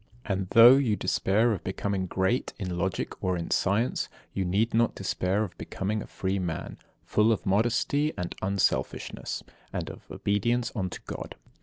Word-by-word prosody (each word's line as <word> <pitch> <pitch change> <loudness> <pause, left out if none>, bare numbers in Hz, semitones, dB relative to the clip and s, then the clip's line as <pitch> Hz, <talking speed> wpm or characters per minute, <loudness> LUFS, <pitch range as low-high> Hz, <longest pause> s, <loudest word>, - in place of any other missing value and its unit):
And 95 -2 -1
though 120 +3 +10
you 125 -7 +2
despair 100 +4 +2
of 100 - -2
becoming 95 0 -2
great 95 +8 0
in 90 -4 -3
Logic 95 +1 -2
or 90 -1 +1
in 85 - -5
Science, 105 +6 +1 0.2
you 95 - 0
need 100 +6 +1
not 115 0 +2
despair 95 +1 0
of 100 - -6
becoming 105 +3 -2
a - - -8
free 95 +1 -2
man, 90 -3 -4 0.3
full 105 +2 +3
of 110 - -1
modesty 120 +9 +2
and 90 -2 -3
unselfishness, 100 0 -1 0.3
and - - -3
of - - -14
obedience 120 +4 0
unto 95 -5 -3
God. - - -6
100 Hz, 160 wpm, -28 LUFS, 95-115 Hz, 0.3 s, though